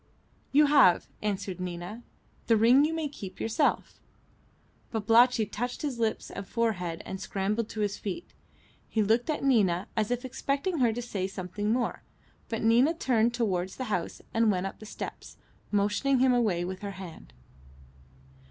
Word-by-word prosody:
"You 295 Hz, +2 st, +6 dB
have," 275 Hz, -12 st, +5 dB, 0.2 s
answered 200 Hz, -3 st, -3 dB
Nina. 180 Hz, +5 st, -5 dB, 0.5 s
"The 225 Hz, -, +5 dB
ring 245 Hz, +6 st, +6 dB
you 310 Hz, -, 0 dB
may 320 Hz, -2 st, -2 dB
keep 195 Hz, -9 st, -9 dB
yourself." 225 Hz, +7 st, 0 dB, 0.9 s
Babalatchi 225 Hz, +2 st, +4 dB
touched 245 Hz, +7 st, -4 dB
his 270 Hz, -5 st, -3 dB
lips 225 Hz, -1 st, -1 dB
and 200 Hz, -1 st, -7 dB
forehead, 180 Hz, -8 st, -1 dB
and 190 Hz, 0 st, -6 dB
scrambled 205 Hz, +3 st, -2 dB
to 215 Hz, -, -4 dB
his 205 Hz, -1 st, -1 dB
feet. 210 Hz, -, -6 dB, 0.6 s
He 220 Hz, -, +1 dB
looked 225 Hz, +7 st, +2 dB
at 305 Hz, -, -1 dB
Nina, 205 Hz, -9 st, +2 dB
as 215 Hz, -2 st, 0 dB
if 245 Hz, +1 st, -2 dB
expecting 280 Hz, +6 st, -2 dB
her 240 Hz, -3 st, +4 dB
to 240 Hz, +2 st, -4 dB
say 200 Hz, -6 st, -3 dB
something 190 Hz, +2 st, -4 dB
more, 240 Hz, +1 st, -1 dB, 0.5 s
but 225 Hz, -1 st, -3 dB
Nina 245 Hz, +8 st, +4 dB
turned 235 Hz, -6 st, +2 dB
towards 185 Hz, -6 st, -1 dB
the 250 Hz, -5 st, -3 dB
house 175 Hz, -3 st, -3 dB
and 225 Hz, -1 st, +3 dB
went 185 Hz, -1 st, -1 dB
up 195 Hz, -, -6 dB
the 215 Hz, -, -10 dB
steps, -, -, -8 dB, 0.3 s
motioning 210 Hz, +7 st, +2 dB
him 255 Hz, 0 st, +4 dB
away 205 Hz, -8 st, +1 dB
with 185 Hz, +1 st, -5 dB
her 200 Hz, -1 st, -5 dB
hand. 175 Hz, -, -10 dB
220 Hz, 160 wpm, -28 LUFS, 195-245 Hz, 0.9 s, You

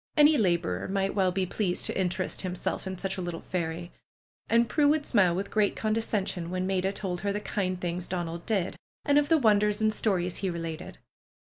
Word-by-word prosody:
Any 300 Hz, +1 st, +7 dB
laborer 170 Hz, -, +1 dB
might 195 Hz, 0 st, 0 dB
well 190 Hz, -2 st, +2 dB
be 185 Hz, +1 st, 0 dB
pleased 180 Hz, -1 st, -1 dB
to -, -, -1 dB
in 180 Hz, -, +2 dB
terest 180 Hz, +1 st, -2 dB
himself 185 Hz, +1 st, -3 dB
in 190 Hz, 0 st, -4 dB
such 195 Hz, +1 st, -2 dB
a -, -, -3 dB
little 175 Hz, -2 st, -4 dB
fairy. 170 Hz, -1 st, -3 dB, 0.6 s
And 235 Hz, +1 st, +4 dB
Prue 290 Hz, +6 st, +3 dB
would 295 Hz, 0 st, +2 dB
smile 185 Hz, -7 st, +3 dB
with 195 Hz, +2 st, -3 dB
great 210 Hz, -2 st, +2 dB
condescension 210 Hz, -5 st, -1 dB
when 185 Hz, +1 st, -2 dB
'Maida 190 Hz, 0 st, 0 dB
told 185 Hz, -3 st, -3 dB
her 200 Hz, -, 0 dB
the 205 Hz, -, -1 dB
kind 185 Hz, -3 st, -2 dB
things 175 Hz, 0 st, -3 dB
Donald 170 Hz, -2 st, -4 dB
did, 195 Hz, -5 st, 0 dB, 0.3 s
and 285 Hz, 0 st, +5 dB
of 290 Hz, -, -1 dB
the 325 Hz, -, +6 dB
wonders 210 Hz, -4 st, +3 dB
and 215 Hz, 0 st, +2 dB
stories 180 Hz, -5 st, 0 dB
he 195 Hz, -, -1 dB
related. 165 Hz, -2 st, -5 dB
190 Hz, 205 wpm, -28 LUFS, 180-210 Hz, 0.6 s, Any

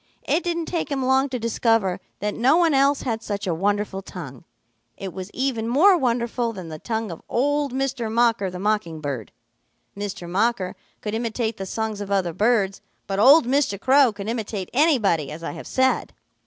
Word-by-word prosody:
It 350 Hz, -, +2 dB
didn't 340 Hz, -2 st, -1 dB
take 335 Hz, -1 st, -2 dB
him 270 Hz, -2 st, -1 dB
long 265 Hz, +2 st, +3 dB
to 255 Hz, -, -2 dB
discover 225 Hz, -4 st, +1 dB, 0.2 s
that 210 Hz, 0 st, -1 dB
no 260 Hz, +7 st, +3 dB
one 335 Hz, -3 st, +3 dB
else 275 Hz, +1 st, +3 dB
had 225 Hz, -3 st, -2 dB
such 205 Hz, -2 st, -4 dB
a 180 Hz, -, 0 dB
wonderful 200 Hz, +2 st, -1 dB
tongue. 140 Hz, -10 st, -9 dB, 0.5 s
It 195 Hz, -2 st, -6 dB
was 190 Hz, 0 st, -6 dB
even 250 Hz, -4 st, -1 dB
more 330 Hz, +11 st, +5 dB
wonderful 240 Hz, -4 st, 0 dB
than 185 Hz, -5 st, -8 dB
the 155 Hz, -1 st, -7 dB
tongue 220 Hz, -1 st, -3 dB
of 165 Hz, -, -8 dB
old 290 Hz, +2 st, +1 dB
Mr. 260 Hz, -3 st, -2 dB
Mocker 230 Hz, -4 st, +2 dB
the 180 Hz, -, -7 dB
Mocking 200 Hz, -5 st, -1 dB
Bird. 140 Hz, -8 st, -5 dB, 0.6 s
Mr. 200 Hz, -3 st, -5 dB
Mocker 200 Hz, +1 st, 0 dB, 0.3 s
could 210 Hz, -, -4 dB
imitate 225 Hz, 0 st, -2 dB
the 195 Hz, -, -5 dB
songs 220 Hz, 0 st, -3 dB
of 200 Hz, -, -5 dB
other 190 Hz, -4 st, 0 dB
birds, 205 Hz, -1 st, +1 dB, 0.2 s
but 195 Hz, 0 st, -2 dB
old 280 Hz, +7 st, +7 dB
Mr. 255 Hz, -6 st, +1 dB
Crow 265 Hz, +1 st, +5 dB
could 205 Hz, -1 st, -7 dB
imitate 215 Hz, -4 st, -4 dB
anybody, 235 Hz, -, +3 dB
as 165 Hz, +2 st, -8 dB
I -, -, -3 dB
have -, -, -9 dB
said. 260 Hz, 0 st, +1 dB
225 Hz, 185 wpm, -23 LUFS, 195-260 Hz, 0.6 s, old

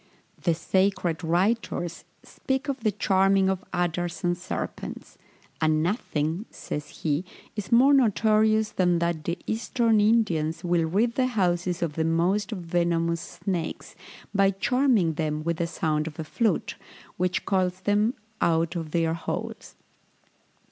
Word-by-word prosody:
The 170 Hz, -2 st, +2 dB
sacred 185 Hz, -2 st, 0 dB
writers 175 Hz, 0 st, 0 dB, 0.2 s
speak 265 Hz, +2 st, -3 dB
of 275 Hz, -1 st, -2 dB
the 220 Hz, -2 st, +1 dB
charming 195 Hz, -1 st, +3 dB
of 190 Hz, -1 st, -2 dB
adders 175 Hz, -1 st, -2 dB
and 175 Hz, 0 st, +2 dB
serpents; 180 Hz, +1 st, -6 dB, 0.5 s
and 155 Hz, 0 st, +2 dB
nothing, 170 Hz, -, -1 dB
says 150 Hz, 0 st, -6 dB
he, 150 Hz, +1 st, +1 dB, 0.3 s
is 210 Hz, 0 st, -5 dB
more 260 Hz, +5 st, +6 dB
notorious 220 Hz, -3 st, +3 dB
than 180 Hz, -2 st, +2 dB
that 170 Hz, -2 st, -1 dB
the 170 Hz, +1 st, -1 dB
eastern 225 Hz, 0 st, +1 dB
Indians 175 Hz, -7 st, +2 dB
will 175 Hz, -2 st, +2 dB
rid 210 Hz, +8 st, +1 dB
the 255 Hz, 0 st, +1 dB
houses 180 Hz, -6 st, 0 dB
of 160 Hz, -3 st, -2 dB
the 160 Hz, -, -1 dB
most 175 Hz, +6 st, +1 dB
venomous 170 Hz, -3 st, 0 dB
snakes, 175 Hz, 0 st, -4 dB, 0.4 s
by 195 Hz, -1 st, +4 dB
charming 225 Hz, -, +2 dB
them 155 Hz, -1 st, -2 dB
with 170 Hz, 0 st, -1 dB
the 170 Hz, -, -1 dB
sound 155 Hz, -2 st, -1 dB
of 155 Hz, -, -8 dB
a 160 Hz, -, -3 dB
flute, 220 Hz, +8 st, -1 dB, 0.4 s
which 180 Hz, 0 st, 0 dB
calls 185 Hz, -1 st, 0 dB
them 210 Hz, +4 st, +2 dB, 0.3 s
out 165 Hz, +1 st, +2 dB
of 165 Hz, -2 st, -4 dB
their 165 Hz, 0 st, +1 dB
holes. 165 Hz, -, -5 dB
175 Hz, 140 wpm, -26 LUFS, 165-210 Hz, 0.5 s, more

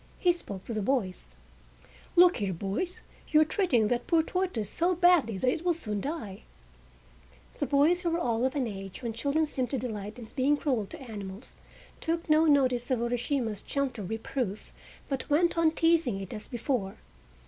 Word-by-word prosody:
He 355 Hz, -1 st, +3 dB
spoke 200 Hz, -, -8 dB
to 235 Hz, -, -5 dB
the 215 Hz, -, -1 dB
boys: 190 Hz, -, -2 dB, 0.8 s
"Look 355 Hz, +1 st, +7 dB
here, 200 Hz, -4 st, -1 dB
boys, 200 Hz, -, -3 dB, 0.3 s
you 305 Hz, -, +4 dB
are -, -, +5 dB
treating 295 Hz, -, +2 dB
that 245 Hz, -1 st, -1 dB
poor 330 Hz, -2 st, +4 dB
tortoise 360 Hz, -, -1 dB
so 345 Hz, -, +1 dB
badly 340 Hz, -, +4 dB
that 250 Hz, -, -1 dB
it 305 Hz, +6 st, +1 dB
will 350 Hz, -2 st, +2 dB
soon 210 Hz, -10 st, -3 dB
die!" 220 Hz, -, -5 dB, 1.2 s
The -, -, 0 dB
boys, 300 Hz, +5 st, +3 dB
who 345 Hz, -, 0 dB
were 335 Hz, -, 0 dB
all 235 Hz, -7 st, 0 dB
of 260 Hz, +1 st, 0 dB
an 275 Hz, -3 st, +1 dB
age 195 Hz, +1 st, -7 dB
when 230 Hz, -1 st, -2 dB
children 280 Hz, +7 st, +1 dB
seem 260 Hz, -4 st, -2 dB
to 270 Hz, -, -2 dB
delight 215 Hz, -3 st, -5 dB
in 230 Hz, -3 st, -9 dB
being 285 Hz, +2 st, +3 dB
cruel 250 Hz, -9 st, -1 dB
to -, -, -9 dB
animals, 210 Hz, -3 st, -8 dB, 0.4 s
took 330 Hz, +1 st, -2 dB
no 310 Hz, +1 st, +5 dB
notice 260 Hz, -5 st, +3 dB
of 255 Hz, -, +2 dB
Urashima's 235 Hz, -2 st, -1 dB
gentle 270 Hz, -6 st, -2 dB
reproof, 220 Hz, +1 st, -4 dB, 0.4 s
but 270 Hz, +1 st, -3 dB
went 340 Hz, +4 st, +3 dB
on 330 Hz, -1 st, +4 dB
teasing 325 Hz, -9 st, +2 dB
it 195 Hz, -2 st, -7 dB
as 210 Hz, -, -7 dB
before. 240 Hz, -5 st, -2 dB
255 Hz, 180 wpm, -29 LUFS, 215-315 Hz, 1.2 s, Look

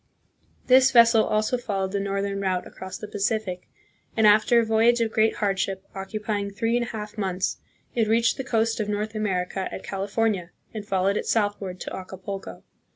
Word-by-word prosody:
This 260 Hz, +1 st, +6 dB
vessel 230 Hz, -3 st, +6 dB
also 215 Hz, +4 st, 0 dB
followed 195 Hz, -5 st, -2 dB
the 200 Hz, -, -1 dB
northern 200 Hz, 0 st, -2 dB
route 185 Hz, -2 st, -1 dB
across 190 Hz, 0 st, -8 dB
the 210 Hz, -, -8 dB
Pacific, 205 Hz, -3 st, -2 dB, 0.5 s
and 220 Hz, -, +4 dB
after 215 Hz, +3 st, +6 dB
a 230 Hz, -, +2 dB
voyage 225 Hz, +2 st, +3 dB
of 230 Hz, -1 st, 0 dB
great 220 Hz, 0 st, +2 dB
hardship, 195 Hz, -1 st, -1 dB
occupying 200 Hz, +1 st, -3 dB
three 225 Hz, +3 st, -1 dB
and 240 Hz, -1 st, 0 dB
a -, -, -7 dB
half 210 Hz, -1 st, -7 dB
months, 190 Hz, -2 st, -1 dB, 0.4 s
it 225 Hz, -2 st, +1 dB
reached 230 Hz, +1 st, +2 dB
the 265 Hz, -, -3 dB
coast 230 Hz, -3 st, 0 dB
of 210 Hz, -1 st, -2 dB
North 210 Hz, +1 st, -2 dB
America 190 Hz, -3 st, -2 dB
at -, -, -7 dB
Califor 205 Hz, +3 st, 0 dB
nia 180 Hz, -4 st, -5 dB, 0.2 s
and 210 Hz, -2 st, -6 dB
followed 195 Hz, +1 st, +1 dB
it -, -, -3 dB
southward 205 Hz, -4 st, -1 dB
to -, -, -5 dB
Acapulco. 190 Hz, +1 st, -7 dB
210 Hz, 180 wpm, -25 LUFS, 195-225 Hz, 0.5 s, This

